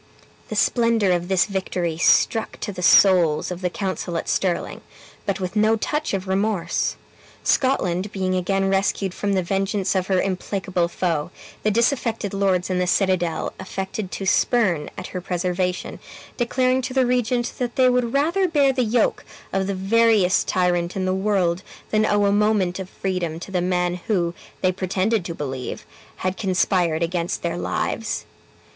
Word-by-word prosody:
The - - -4
splendor 230 -5 +2
of 175 0 0
this 190 -1 +3
victory 185 -4 -2
struck 220 +5 +2
to - - -3
the 180 - -6
souls 180 -4 +5
of 180 0 -5
the 180 - 0
council 185 -2 -3
at - - -4
Stirling, 185 -3 -1 0.5
but 200 +1 -1
with 185 +2 -4
no 215 +1 +4
touch 300 +2 -1
of 190 0 -4
remorse. 190 -3 0 0.5
Scotland 195 -8 +1
being 185 -2 -1
again 195 +1 0
rescued 195 -1 0
from 200 0 -1
the 190 -1 +1
vengeance 195 +1 0
of 190 -1 0
her 190 -2 +2
implacable 185 -2 -1
foe, 170 -3 -1 0.3
the 215 - +1
disaffected 230 -2 0
lords 190 -2 +1
in 180 - 0
the 180 - 0
citadel 180 -4 +1
affected 190 +1 -5
to 195 - -4
spurn 185 -6 +2
at - - -6
her 180 - -5
preservation, 180 0 -2 0.4
declaring 255 +1 +1
to 255 +1 -5
the 260 -1 +4
regent 245 0 0
that 245 -2 -2
they 260 -1 +4
would 250 -2 +2
rather 335 +8 +2
bear 285 -5 +3
the 255 -1 +1
yoke 225 0 +1 0.3
of 190 0 0
the 200 - -1
veriest 205 -1 +3
tyrant 175 -1 +1
in 190 -1 -1
the 185 - +1
world 190 -3 +1 0.3
than 215 0 +3
owe 205 0 +2
a 200 - +3
moment 205 -3 +2
of 190 -1 -6
freedom 180 -5 -3
to 185 - -9
the 180 -2 0
man 180 0 0
who 175 -6 +1 0.3
(they 185 - +3
pretended 190 +3 0
to 170 -1 -5
believe) 130 -4 -5 0.4
had 185 0 0
conspired 180 -4 +1
against 170 0 -2
their 170 0 -1
lives. 215 +4 -2
190 Hz, 165 wpm, -22 LUFS, 180-215 Hz, 0.5 s, souls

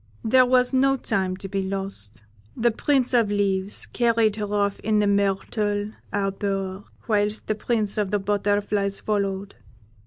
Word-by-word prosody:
There 255 +3 +5
was 250 0 +3
no 270 +1 +3
time 190 -6 -1
to 195 - -6
be 195 0 -2
lost 190 - -6 0.3
the 235 +1 +3
Prince 260 +2 +1
of 230 -4 +3
Leaves 200 -1 0
carried 230 -3 +2
her 210 -1 -3
off 200 -1 0
in 215 0 0
the 210 - +3
myrtle 205 +1 0 0.2
arbour, 195 -1 -2 0.2
whilst 210 -1 0
the - - 0
Prince 215 -1 -1
of 205 -2 0
the 205 - +1
Butterflies 205 0 0
followed. 200 -1 -2
205 Hz, 150 wpm, -24 LUFS, 195-220 Hz, 0.3 s, There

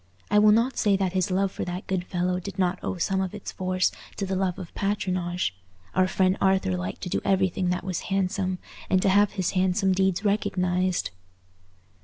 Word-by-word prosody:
I 210 - +6
will 210 0 +6
not 235 +4 +2
say 200 -2 +3
that 190 -2 -1
his 185 -1 +1
love 190 +1 +1
for - - -4
that 180 +3 -5
good 185 -2 -2
fellow 180 0 -1
did 190 +1 -7
not 185 -1 +1
owe 195 - -2
some 190 +2 0
of 190 +1 -3
its 210 - -6
force 185 0 0 0.3
to 200 - -1
the 190 0 -2
love 185 -2 0
of 180 -3 -8
patronage: 180 - -1 0.4
our 185 0 +3
friend 185 0 +2
Arthur 190 - +2
liked 90 +1 -4
to 180 - -4
do - - -1
everything 190 -1 +1
that 180 0 -1
was 185 -2 -2
handsome, 185 -1 0 0.3
and 185 - +4
to - - +4
have 205 +1 +4
his 185 -4 -1
handsome 190 +1 +2
deeds 190 +1 +1
recognized. 185 - 0
185 Hz, 200 wpm, -26 LUFS, 180-195 Hz, 0.4 s, I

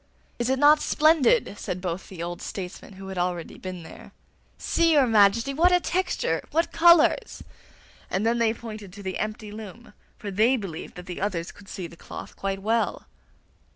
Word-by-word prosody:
'Is 240 +1 0
it 265 - +2
not 295 +2 +6
splendid!' 310 - +3
said 180 - -4
both 180 0 -4
the 175 -3 -6
old 175 0 -5
statesmen 190 +1 -7
who 190 0 -9
had 190 -2 -4
already 175 -1 -3
been 185 -2 -7
there. - - -13 0.4
'See, 335 -1 +2
your 285 -3 +5
Majesty, 225 +3 +4
what 340 +6 +4
a 360 - +5
texture! 370 +2 -1
What 330 +2 0
colours!' 340 0 +4 0.7
And 195 +3 -1
then 235 +1 +2
they 230 -1 +3
pointed 215 -4 -8
to 200 0 -10
the 190 -1 -4
empty 215 0 -4
loom, 220 +1 -10 0.2
for 205 - -6
they 225 +7 +3
believed 185 -7 -7
that 180 - -9
the 180 -1 -6
others 180 -4 -2
could 195 -1 -16
see 185 - -6
the 170 - -10
cloth - - -9
quite 195 0 -3
well. 225 +2 0
210 Hz, 185 wpm, -25 LUFS, 190-265 Hz, 0.7 s, not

